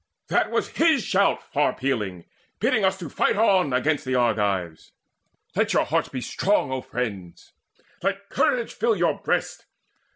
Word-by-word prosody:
That - - +2
was - - -1
his 315 -7 +2
shout 200 +1 +1
far 145 0 +2
pealing, 105 -10 -3 0.3
bidding 215 - +2
us 190 0 +1
Fight 165 -6 0
on 195 -8 +3
against 145 +4 +1
the 130 0 -2
Argives. 100 -9 0 0.6
Let - - +1
your - - +3
hearts - - 0
Be 130 - -5
strong, 190 -1 0
O 130 -1 -2
friends: 100 -10 -6 0.5
let 200 0 -2
courage 240 -2 +1
fill 225 +1 +1
your 170 -5 0
breasts. - - -1
140 Hz, 150 wpm, -24 LUFS, -, 0.6 s, on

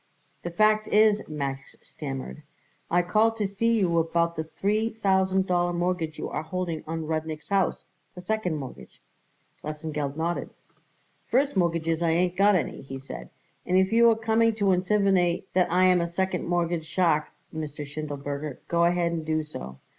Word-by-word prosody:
"The 175 - -4
fact 215 +4 +3
is," 210 0 +4
Max 140 -3 -4
stammered, 135 - -6 0.5
"I 175 +1 +3
called 220 +5 +2
to 210 - 0
see 230 +4 +1
you 170 -4 +2
about 170 +1 +1
the 160 - -3
three 210 +7 0
thousand 190 -3 +1
dollar 175 -1 +1
mortgage 175 -3 -1
you - - -4
are - - -2
holding 165 0 -4
on 160 0 -3
Rudnik's 155 -1 -4
house 195 -1 +1 0.3
the 180 - -8
second 185 -3 -1
mortgage." 135 -4 -9 0.6
Lesengeld 150 -2 -4
nodded. 170 +2 -2 0.8
"First 275 +1 +2
mortgages 165 -2 +1
I 170 - +2
ain't 175 +2 +1
got 200 +1 +5
any," 180 - -2
he 135 0 -7
said, 95 - -9 0.3
"and 180 - +1
if 190 +3 +3
you 235 0 +6
are 225 - +4
coming 225 0 +2
to 200 -3 +2
insinivate 185 -2 +2
that 180 -2 +2
I 180 +1 +4
am 180 -1 +5
a 170 - 0
second 180 +1 -2
mortgage 170 -2 0
shark, 165 -4 +2 0.3
Mr. 150 -2 -5
Schindelberger, 145 -1 -5
go 170 0 +3
ahead 170 -1 +2
and 165 -1 -3
do 155 0 0
so. 65 - -8
175 Hz, 170 wpm, -26 LUFS, 155-195 Hz, 0.8 s, you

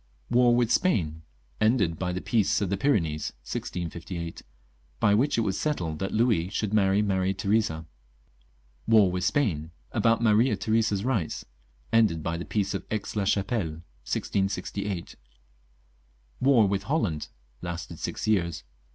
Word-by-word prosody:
War 120 0 +5
with 120 -1 +2
Spain. 85 - +1 0.4
Ended 110 -8 +2
by 90 -1 -1
the 90 +1 -3
Peace 110 -3 +2
of 100 -3 -1
the - - +2
Pyrenees, 85 - 0
1658. 85 +2 -5 0.6
(By 105 - +4
which 125 +7 +2
it - - +3
was 95 -3 -1
settled 85 - -2
that 95 - -2
Louis 110 -7 +2
should 105 +1 -2
marry 100 -1 +3
Maria 95 -1 0
Theresa.) 100 -6 0 1.0
War 110 -5 +5
with 90 0 -2
Spain 90 - 0 0.2
(about 115 0 +3
Maria 110 +1 +4
Theresa's 110 0 0
rights). 110 -12 -1 0.5
Ended 105 -9 +3
by 85 +2 -1
the 85 - -5
Peace 100 -2 -1
of - - -3
Aix 110 -1 -3
la 100 -2 0
Chapelle, 95 -5 -1 0.3
1668. 100 -1 -2 1.2
War 125 -6 +5
with 95 0 0
Holland 105 - 0 0.3
(lasted 85 -1 -6
six - - -4
years). 85 -6 +1
100 Hz, 140 wpm, -27 LUFS, 85-110 Hz, 1.2 s, War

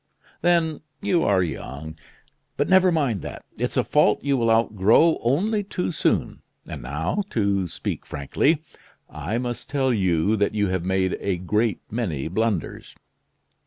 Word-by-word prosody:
Then, 170 -2 +2 0.2
you 195 -4 +1
are 95 -2 +3
young. 80 -1 -6 0.6
But 145 - +1
never 190 -1 +5
mind 135 - 0
that, - - -8
it's - - -1
a - - +3
fault - - +2
you 140 0 +2
will 115 -3 +1
outgrow 115 - +4
only 200 - +1
too 180 -2 -3
soon. 155 - 0 0.3
And - - -7
now, 75 - -2
to 100 -4 0
speak - - -5
frankly, 140 - 0 0.5
I 110 - -3
must 120 -1 -4
tell 135 -2 +1
you 95 -1 +2
that 100 +1 0
you 105 -2 +1
have 95 -2 -1
made 95 0 0
a 95 -3 -1
great 105 +5 0
many 95 - -2
blunders." 105 -2 -2
110 Hz, 150 wpm, -24 LUFS, 95-145 Hz, 0.6 s, never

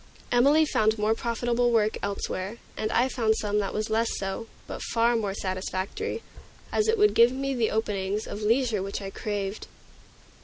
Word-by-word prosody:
Emilie 280 +6 +5
found 220 -6 +2
more 215 +1 +2
profitable 240 +1 0
work 220 -2 +2
elsewhere, 200 +1 -3 0.2
and 215 - -2
I 245 - +3
found 225 -4 +1
some 210 0 0
that 200 - -1
was 215 +1 -3
less 225 +1 +2
so, 195 +4 -4 0.2
but - - -7
far 235 +1 +2
more 205 -4 -1
satisfactory, 190 - -3 0.5
as 430 - +1
it 450 +1 +3
would 420 0 +5
give 235 +1 +6
me 275 +1 -2
the 235 -4 +1
openings 205 -1 -1
of 205 - -6
leisure 225 -1 +2
which 195 +1 -4
I 195 -1 -6
craved. 205 -1 -4
220 Hz, 170 wpm, -27 LUFS, 205-240 Hz, 0.5 s, give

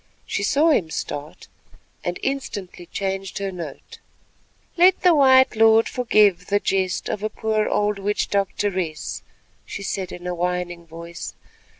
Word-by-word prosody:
She - - -2
saw 295 +10 +3
him 180 - +2
start, 145 -1 -6 0.6
and 175 0 -2
instantly 200 -10 -4
changed 195 0 -3
her 195 -1 -3
note. 170 -6 -9 0.8
"Let 365 +2 +5
the 360 -2 +6
white 260 -4 +5
lord 225 0 +5
forgive 210 -7 +3
the 205 0 +2
jest 190 -2 -1
of 210 - -3
a 215 - -1
poor 215 0 -1
old 205 -1 0
witch 205 +1 -1
doctoress," 190 -5 -2 0.4
she 200 - -7
said 190 -2 -3
in 175 - -9
a 180 - -2
whining 175 -1 -3
voice. 170 +1 -8
195 Hz, 140 wpm, -23 LUFS, 180-220 Hz, 0.8 s, the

